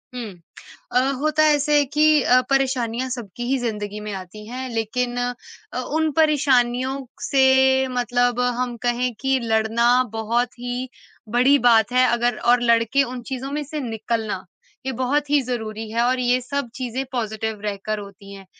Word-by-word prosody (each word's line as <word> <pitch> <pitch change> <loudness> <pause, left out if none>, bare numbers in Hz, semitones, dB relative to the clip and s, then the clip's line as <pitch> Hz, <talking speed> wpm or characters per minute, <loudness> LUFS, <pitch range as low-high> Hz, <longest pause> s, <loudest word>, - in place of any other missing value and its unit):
हुँ। 230 -5 -5 0.6
अ, 250 - +3 0.2
होता 310 +1 +2
ऐसे 295 0 +3
है 290 - +3
कि 300 +1 +3
अ, 255 +1 +5
परेशानियाँ 260 -2 0
सबकी 240 -2 -6
ही 270 - +2
ज़िंदगी 210 -3 -4
में - - -4
आती 195 +3 -8
हैं 255 +2 -5
लेकिन 240 +2 -2
अ, 245 0 -5
उन 310 +4 -1
परेशानियों 265 -3 +2 0.3
से 270 -2 +4 0.5
मतलब 245 0 +1 0.2
हम 245 -1 -2
कहें 245 +1 0
कि 270 -1 +1
लड़ना 225 +1 +1 0.3
बहुत 235 +2 -1
ही 245 +1 -4 0.4
बड़ी 255 +5 +4
बात 225 -3 +4
है, 255 0 +4
अगर 240 -1 +1
और 240 0 +3
लड़ 230 -1 +4
के 275 +5 +2
उन 250 -1 -6
चीज़ों 265 +1 -4
में 295 +1 -2
से 305 +2 -6
निकलना 220 -3 -3 0.4
ये 265 - -1
बहुत 285 +3 0
ही 290 -1 +4
ज़रूरी 220 -2 -4
है 230 +2 0
और 255 +2 +2
ये 250 0 +2
सब 280 0 -3
चीज़ें 255 0 -3
पॉज़िटिव 220 -3 -3
रहकर 210 +1 -3
होती 200 0 -11
हैं। 195 -1 -11
245 Hz, 165 wpm, -22 LUFS, 225-265 Hz, 0.6 s, अ